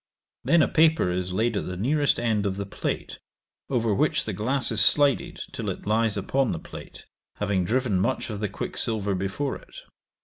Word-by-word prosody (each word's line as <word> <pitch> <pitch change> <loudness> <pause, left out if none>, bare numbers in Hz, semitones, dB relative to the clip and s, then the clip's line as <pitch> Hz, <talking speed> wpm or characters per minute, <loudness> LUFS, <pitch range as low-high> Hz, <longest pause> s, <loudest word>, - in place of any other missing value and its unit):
Then 170 -1 +4
a - - +2
paper 160 - +3
is 90 +1 -2
laid 110 +4 0
at - - -2
the 90 0 -5
nearest 145 +8 +2
end 110 -4 +1
of 95 - -2
the 100 - -3
plate, 100 - -4 0.5
over 115 -5 +1
which 95 - +1
the - - -3
glass 130 +5 0
is 110 -2 +4
slided 145 +3 +3
till - - -4
it - - -6
lies 110 0 +1
upon 135 -2 0
the 80 - -4
plate, - - -11 0.3
having 100 -3 0
driven 115 -2 +1
much 120 +4 -1
of 105 - -5
the 105 -1 -2
quicksilver 105 -1 -2
before 100 +9 -2
it. - - -18
110 Hz, 190 wpm, -26 LUFS, 100-130 Hz, 0.5 s, Then